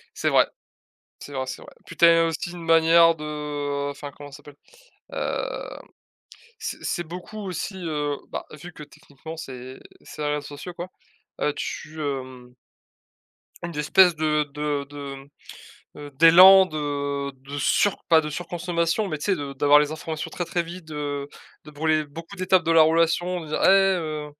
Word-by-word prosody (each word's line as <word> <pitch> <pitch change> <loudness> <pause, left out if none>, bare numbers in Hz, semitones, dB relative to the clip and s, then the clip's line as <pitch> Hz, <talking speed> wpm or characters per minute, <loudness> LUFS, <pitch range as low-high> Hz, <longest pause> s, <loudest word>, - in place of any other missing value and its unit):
C'est - - 0
vrai, - - +4 0.7
c'est - - -10
vrai, 130 -1 -2
c'est 130 - -7
vrai. - - -14
Puis - - -11
tu - - +5
as 165 0 +6
aussi 165 +1 -3
une 175 -1 -9
manière 165 0 +5
de 145 -2 -4
enfin, 145 0 -8
comment 145 +1 -12
ça 140 - -10
s'appelle? 145 0 -15 0.6
Hem, - - -4 0.8
c 445 - -5
c'est 175 - -2
beaucoup 180 +6 -9
aussi, 190 0 -5
heu, 150 -5 -2
bah, - - -5
vu 155 +4 -10
que 150 - -10
techniquement, 145 +2 -12
c'est 130 -3 -9 0.2
c'est - - -10
les 150 - -1
réseaux 150 - -3
sociaux 145 +5 -8
quoi, 175 +1 -7 0.5
heu, 150 - +1
tu, 155 +1 -6
hem 130 -4 -5 1.1
une 170 - -4
d'espèce 170 +3 +4
de 150 -1 +1
de 150 -1 -2
de, 140 -1 -7
mmh 135 0 -12 0.7
heu, 145 0 -9
d'élan 180 +6 +8
de 145 -2 -3
de 135 +2 -9
sur 195 +7 +1
pas 165 -2 +6
de 150 -1 -5
surconsommation, 175 +4 -2
mais 155 - -3
tu 145 - -6
sais, 200 - +2
de 140 -4 -5
d'avoir 145 +2 +5
les 150 - 0
informations 155 0 -5
très, 175 - -4
très 175 +1 -1
vite, 170 +1 -9
de 145 -2 -5 0.4
de 150 - -11
brûler 155 +1 +1
beaucoup 165 +6 -11
d'étapes 185 0 +2
de 165 - -1
la 165 -1 +7
relation, 165 +3 +2
en 165 - -7
disant: 155 - -3
«Et - - +7
heu 180 -6 +2
155 Hz, 175 wpm, -24 LUFS, 145-170 Hz, 1.1 s, d'élan